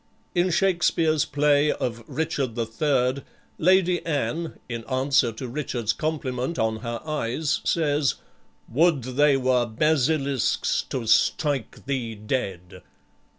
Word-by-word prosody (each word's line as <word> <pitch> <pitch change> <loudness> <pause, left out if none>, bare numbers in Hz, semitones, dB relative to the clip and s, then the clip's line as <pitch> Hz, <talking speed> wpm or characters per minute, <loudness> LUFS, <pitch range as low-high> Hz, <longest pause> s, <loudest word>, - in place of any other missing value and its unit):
In 175 +1 +2
Shakspeare's 170 -4 +2
play 145 +1 +3
of 115 -1 -3
"Richard 145 -7 -2
the 115 -1 -1
Third," 130 +2 0 0.4
Lady 180 +1 +3
Anne, 165 +1 -2
in 115 -2 -5
answer 130 -1 +2
to 125 +4 -6
Richard's 120 -4 -2
compliment 145 -1 -3
on 110 0 0
her 115 +1 -5
eyes, 155 0 -1
says, 150 -4 +1 0.5
"Would 155 +1 +2
they 135 +3 +3
were 125 -2 +2
basilisk's, 140 +1 +1
to 125 -3 -3
strike 135 +4 +1
thee 125 -5 -2
dead!" 95 -5 -4
135 Hz, 115 wpm, -25 LUFS, 120-155 Hz, 0.5 s, play